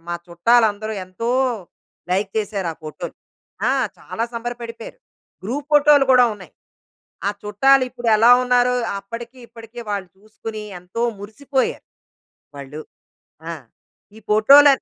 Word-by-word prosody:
మా 175 - -2
చుట్టాలందరూ 215 +4 +2
ఎంతో 205 +6 -4 0.8
లైక్ 195 +2 0
చేసారా 200 -5 -2
ఫోటోలు. 155 +2 -7 0.5
ఆ! - - +3 0.3
చాలా 230 - -4
సంబరపడిపోయారు. 235 - -7 0.5
గ్రూప్ 275 +7 -3
ఫోటోలు 295 -1 +6
కూడా 250 -1 +7
ఉన్నాయి. 195 -3 -13 0.8
ఆ - - +3
చుట్టాలు 270 +6 +4
ఇప్పుడు 240 -1 -6
ఎలా 230 +3 +6
ఉన్నారో, 250 0 +3 0.3
అప్పడికీ 235 +5 -9
ఇప్పడికీ 230 +1 -12
వాళ్ళు 200 -3 -3
చూసుకొని, 215 +1 -8 0.2
ఎంతో 180 +6 -6 0.2
మురిసిపోయారు. 260 +7 -2 0.7
వాళ్ళు. 140 +2 -8 0.7
ఆ! - - -3 0.6
ఈ - - -12
ఫోటోల 275 +8 +7
225 Hz, 115 wpm, -21 LUFS, 200-245 Hz, 0.8 s, కూడా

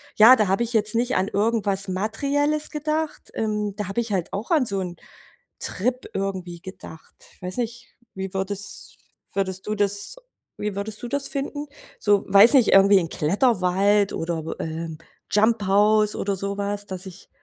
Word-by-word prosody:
ja, 230 +4 +9
da 210 -3 +2
hab 195 +4 +1
ich 235 0 -1
jetzt 215 0 +1
nicht 245 +2 +1
an 190 +2 +1
irgendwas 205 -2 0
Materielles 280 +10 0
gedacht 305 +1 -3
ähm, 210 -2 -2
da 205 -3 -4
hab 195 - -7
ich 230 -3 0
halt 180 -3 -1
auch 210 - -4
an 300 -6 +4
so 200 -3 -2
'n 180 -2 -4 0.6
Trip 250 +6 -2
irgendwie 185 -3 -4
gedacht. 185 -3 -11 0.3
Weiß 180 +5 -5
nicht, 240 0 -5 0.2
wie 190 0 -5
würdes 195 +1 -5 0.4
würdest 190 0 -2
du 215 - -1
das 205 - -1 0.4
wie 210 -1 -3
würdest 210 +1 -4
du - - -3
das 280 +1 -2
finden? 290 +1 -4 0.3
So- 205 -2 +3
weiß 200 +6 +7
nicht- 255 -5 +5
irgendwie 195 0 +7
in 165 -2 -3
Kletterwald 200 - +2
oder, 165 -1 -3 0.2
äh, 165 +1 -4 0.4
Jumphouse 210 0 +3
oder 200 0 -1
so 200 +1 -3
was 205 0 -2
dass 185 0 -6
ich 185 +1 -13
205 Hz, 165 wpm, -24 LUFS, 190-230 Hz, 0.6 s, ja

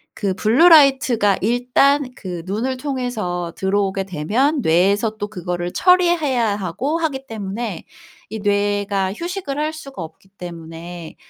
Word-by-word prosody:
그 200 -3 -1
블루라이트가 260 - +5
일단 250 +5 +2
그 180 -4 -6
눈을 230 +7 -2
통해서 245 - -3
들어오게 195 0 0
되면 225 - 0
뇌에서 200 +5 +2
또 205 - -3
그거를 180 -3 -4
처리해야 320 - +3
하고 210 - -2
하기 275 -5 -2
때문에 215 -2 -5 0.5
이 220 - -5
뇌가 205 -1 0
휴식을 340 - -5
할 305 +1 -1
수가 275 - -8
없기 165 +4 -13
때문에 170 -1 -9
210 Hz, 280 characters per minute, -20 LUFS, 190-270 Hz, 0.5 s, 블루라이트가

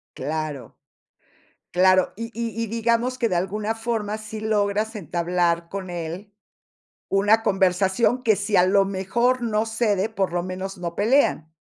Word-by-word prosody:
Claro. 150 -5 -4 0.9
Claro, 185 0 +4
y 230 +2 -4
y 230 -1 -3
y - - -1
digamos 230 +3 0
que 235 -2 +1
de 180 - +1
alguna 210 +5 -1
forma 225 -2 -3
sí 215 0 -7
logras 215 0 0
entablar 175 -2 -1
con 195 -1 -5
él 175 +4 -6 0.7
una 205 +3 +3
conversación 190 +5 +2
que 220 -4 +3
si 205 0 0
a 180 - +6
lo 195 +1 +4
mejor 235 +7 0
no 220 -1 0
cede, 220 -3 0
por 195 -5 -2
lo 175 0 0
menos 185 +2 -5
no 170 -1 -4
pelean. 205 - +2
200 Hz, 150 wpm, -23 LUFS, 185-225 Hz, 0.9 s, a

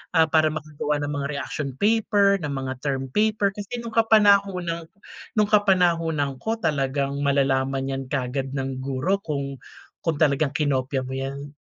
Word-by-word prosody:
ah, 160 - +7
para 160 0 +3
makagawa 150 -1 -3
ng 145 - -2
mga 140 -1 -2
reaction 140 -1 -4
paper, 205 - +3
ng 150 - -4
mga 135 -1 -3
term 135 -2 -3
paper. 210 -1 +2
Kasi 205 +4 -6
nung 230 - -6
kapanahunan 200 -7 +3 0.5
nung 210 -1 +2
kapanahunan 165 -9 +2
ko, 225 +1 -1
talagang 140 -6 -1
malalaman 135 -1 +1
'yan 135 0 -3
kaagad 135 0 -2
ng 135 -1 -3
guro 135 +9 -1
kung 140 -6 -4 0.4
kung 165 -2 -1
talagang 145 -1 +1
kinopya 135 -3 0
mo 130 - -7
'yan. 135 +2 -5
145 Hz, 150 wpm, -24 LUFS, 135-195 Hz, 0.5 s, ah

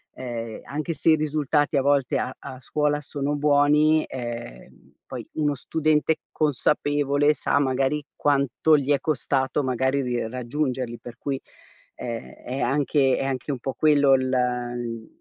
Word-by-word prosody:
ehm, 115 -3 -5
anche 150 +3 -3
se 165 - +2
i - - +6
risultati 150 -1 0
a 135 - +3
volte 140 -2 +2
a 130 - -3
a 130 -2 -9
scuola 150 +3 0
sono 145 0 -3
buoni, 150 +2 +4
ehm, 120 - -8
poi, - - -6
uno 150 -2 +1
studente 155 +2 +1 0.2
consapevole 145 0 +2
sa, 140 0 0
magari, 135 +2 0
quanto 145 +2 +2
gli 140 0 -1
è 140 - +3
costato, 135 -1 0
magari, 130 +2 +1
ri 120 -3 -2
raggiungerli, 125 0 -3
per 120 0 -10
cui 135 0 -3 0.5
è 115 -1 -7
è 130 +2 -4
anche 135 0 +2
è - - -1
anche 135 +1 -2
un 130 - -3
po' 135 +1 -4
quello 145 -3 +4
l 130 0 0
mhmm, 120 -3 -2
140 Hz, 150 wpm, -24 LUFS, 125-145 Hz, 0.5 s, i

